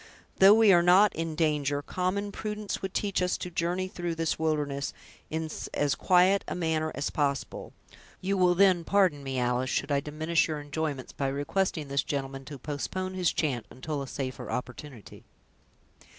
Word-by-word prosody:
"Though 195 +2 +9
we 220 -3 +6
are 175 - +6
not 185 +3 +5
in 165 -1 -3
danger, 145 -3 0
common 195 +5 -2
prudence 210 0 -4
would 190 - -4
teach 200 -3 0
us 180 0 +1
to 180 - -6
journey 175 +2 -1
through 175 -2 -4
this 165 -1 -1
wilderness 145 -3 -1 0.4
in 160 0 -2 0.3
as 145 -1 +2
quiet 185 +2 +4
a - - -3
manner 160 -2 0
as 140 - -2
possible. 140 -2 -2 0.5
You 195 +2 -1
will 180 -2 +4
then, 185 -2 +4
pardon 185 -6 +2
me, 135 -1 -4
Alice, 125 +1 0
should 145 - -1
I 140 - +3
diminish 155 +3 0
your 155 -2 -3
enjoyments, 145 -2 -4
by 140 - -2
requesting 145 +3 -1
this 140 0 +1
gentleman 135 -1 -4
to 145 +1 -8
postpone 155 +7 -4
his 185 -2 +1
chant 130 -8 -1
until 145 +3 -5
a 135 - -5
safer 130 -1 -5
opportunity." 125 0 -7
160 Hz, 170 wpm, -28 LUFS, 140-185 Hz, 0.5 s, Though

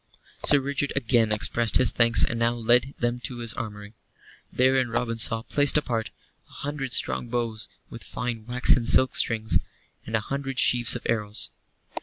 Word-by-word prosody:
Sir 145 - +5
Richard 140 +1 -3
again 120 -4 +1
expressed 115 +2 +1
his 130 -3 +2
thanks, 115 -1 +4
and 115 - -4
now 115 0 +1
led 120 +3 +1
them 120 +1 -2
to 125 0 -6
his 115 -2 -2
armory. 105 -1 -7 0.6
Therein 130 -1 +2
Robin 115 0 -2
saw, 115 0 +1
placed 145 +3 +2
apart, 115 -6 -2 0.4
a - - -20
hundred 140 -3 -5
strong 65 - +2
bows 115 -3 -3 0.2
with - - -9
fine 115 -2 -5
waxen 125 -1 +3
silk 130 - +4
strings, 110 -2 +1 0.5
and 110 - -2
a - - +2
hundred 135 +2 -5
sheaves 120 -1 +4
of - - -6
arrows. 105 -2 -2
120 Hz, 165 wpm, -25 LUFS, 115-130 Hz, 0.6 s, Sir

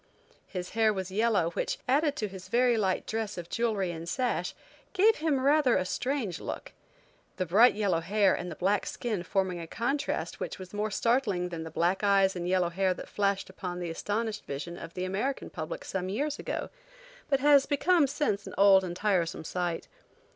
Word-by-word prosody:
His 180 -2 -5
hair 220 -1 +3
was 190 -2 -4
yellow 205 -5 +2
which, - - -2
added 290 +3 +2
to 215 - -2
his 190 -1 -10
very 240 +3 +3
light 190 -4 0
dress 220 -2 -3
of 170 -1 -7
jewelry 215 -6 0
and 165 0 -6
sash, 250 +6 -1 0.4
gave 415 +3 +4
him 305 -3 +1
rather 280 -1 +4
a - - 0
strange 240 - -2
look. - - -6 0.7
The 185 - 0
bright 215 +9 +6
yellow 200 -5 +1
hair 195 +3 +3
and 180 - -3
the 165 - -6
black 195 +5 +1
skin 220 -6 -3
forming 185 -1 -1
a 165 - -6
contrast 270 - -2
which - - -4
was 185 0 -10
more 210 +1 -1
startling 210 -5 +1
than 170 -2 -5
the - - -6
black 175 +5 0
eyes 195 -1 +4
and 175 -1 -3
yellow 180 -2 +2
hair 185 +1 +1
that - - -9
flashed 200 -1 0
upon 180 -1 -6
the 175 -2 -3
astonished 215 +5 -2
vision 150 +5 -5
of 170 -1 -9
the 185 - -2
American 205 +9 -2
public 160 -4 -6
some 185 -1 -3
years 290 +9 -2
ago, - - -4 0.6
but 275 -2 +3
has 285 0 +5
become 320 +1 +3
since 265 -8 -1
an - - -8
old 195 -1 +7
and 175 -1 -4
tiresome 180 -5 0
sight. 175 0 -3
200 Hz, 190 wpm, -29 LUFS, 180-235 Hz, 0.7 s, old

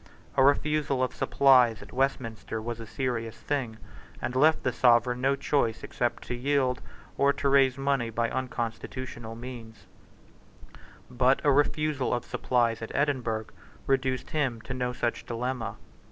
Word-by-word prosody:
A 135 - +5
refusal 145 -1 +2
of 130 - -1
supplies 125 -6 +4
at 100 - -14
Westminster 120 -4 -2
was 115 +1 -5
a 115 - -8
serious 115 -3 -3
thing, 130 -6 -3 0.4
and 125 - -4
left 155 +4 +4
the 125 - 0
Sovereign 125 +1 +3
no 135 +1 +3
choice 120 -6 0
except 120 -1 -2
to - - -5
yield, 130 0 0 0.4
or 140 0 +5
to 140 - -2
raise 135 -2 +4
money 135 -4 0
by 115 +1 0
unconstitutional 120 -1 -4
means, 115 -2 -9 1.3
But 125 +2 +3
a 145 - +4
refusal 145 -1 +1
of 120 - -4
supplies 120 -2 0
at 115 - -5
Edinburgh 125 -6 0 0.4
reduced 130 -1 0
him 135 -7 0
to 125 - -6
no 125 -1 -1
such 120 -1 -3
dilemma. 120 -1 -3
125 Hz, 145 wpm, -28 LUFS, 115-135 Hz, 1.3 s, A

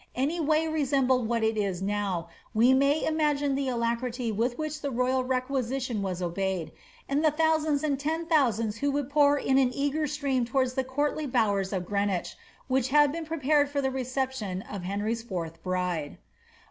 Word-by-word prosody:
any 285 +7 0
way 310 0 +2
resem 285 -4 +1
bled 250 -2 +2
what 230 -1 0
it 220 0 +2
is 200 -4 -1
now, 195 -3 -2 0.3
we 240 +4 +5
may 280 +3 +3
imagine 295 -3 +1
tlie 270 -1 -1
alacrity 235 0 -1
with 235 +4 -1
which 310 -1 -4
the 285 - -2
royal 255 +1 +1
requisition 255 -2 -1
was 185 -2 -3
obeyed, 175 -2 -2 0.4
and 285 +3 0
the 310 - +6
thousands 310 -1 +1
and 285 -3 0
tens 320 +3 -1
of - - -13
thousands 230 - +2
who 285 +4 0
would 285 -1 -2
pour 290 0 +4
in 265 -1 +2
an 255 -2 +3
eager 285 +2 0
stream 280 -3 0
towards 255 +1 0
the 265 - 0
courtly 290 +3 -1
bowers 205 -6 +1
of 185 -3 -2
Green 200 +1 0
wich, 180 -3 -3 0.3
which 260 -1 +1
had 295 +1 +4
been 325 +1 -5
prepared 295 -2 +2
for 285 0 -2
the 265 -1 0
reception 255 -7 -3
of 200 -2 -7
Henry's 210 +4 -2
fourth 165 -7 -5
bride. 180 -5 -2
260 Hz, 185 wpm, -28 LUFS, 215-285 Hz, 0.4 s, the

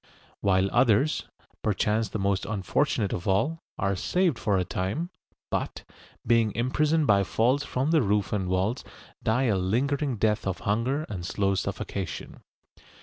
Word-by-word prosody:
While 95 -1 +3
others, 125 +4 +3 0.3
perchance 105 +1 +1
the - - -3
most 100 -1 0
unfortunate 105 +1 0
of 85 - -4
all, 150 - +1 0.2
are 100 0 0
saved 170 - +1
for 100 -3 +1
a 90 - 0
time, 100 - -2 0.4
but, - - -2 0.4
being 115 -2 +3
imprisoned 150 +6 +2
by 100 -5 +4
falls 125 +8 +1
from 135 +2 -1
the 160 -2 +4
roof 105 -3 +1
and 95 -3 -1
walls, 95 +7 0 0.4
die 115 +4 +1
a 110 -6 +2
lingering 130 +8 0
death 105 -1 +1
of 95 - -2
hunger 120 +8 0
and 90 -4 -5
slow 100 +2 0
suffocation. 95 -2 -4
110 Hz, 145 wpm, -27 LUFS, 100-135 Hz, 0.4 s, by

